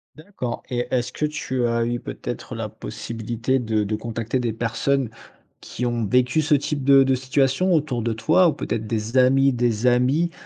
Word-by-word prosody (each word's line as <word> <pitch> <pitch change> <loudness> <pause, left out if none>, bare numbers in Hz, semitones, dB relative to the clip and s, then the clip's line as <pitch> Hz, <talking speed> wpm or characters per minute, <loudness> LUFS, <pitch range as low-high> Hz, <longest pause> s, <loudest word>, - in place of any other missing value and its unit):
D'accord. 155 -7 -6
Et 120 -1 -1
est-ce 125 -1 0
que 150 - -1
tu 130 -5 -2
as 115 0 0
eu, 120 +1 -2
peut - - -8
être, - - -5
la - - -3
possibilité 115 +3 -3
de 110 -3 0
de 105 +1 -2
contacter 115 +2 -3
des 120 -3 -1
personnes 120 +3 0 0.5
qui 125 - -5
ont 120 -2 -1
vécu 125 +7 +2
ce 150 0 +3
type 145 0 -2
de 135 0 +6
de 135 0 +2
situation 135 +7 +1
autour 145 -7 0
de 115 0 -1
toi 160 +11 +3
ou 160 - +2
peut-être 115 -5 -4
des 110 +2 -2
amis 135 +1 +4
des 120 -1 0
amis, 130 +8 +2
125 Hz, 190 wpm, -23 LUFS, 115-135 Hz, 0.5 s, de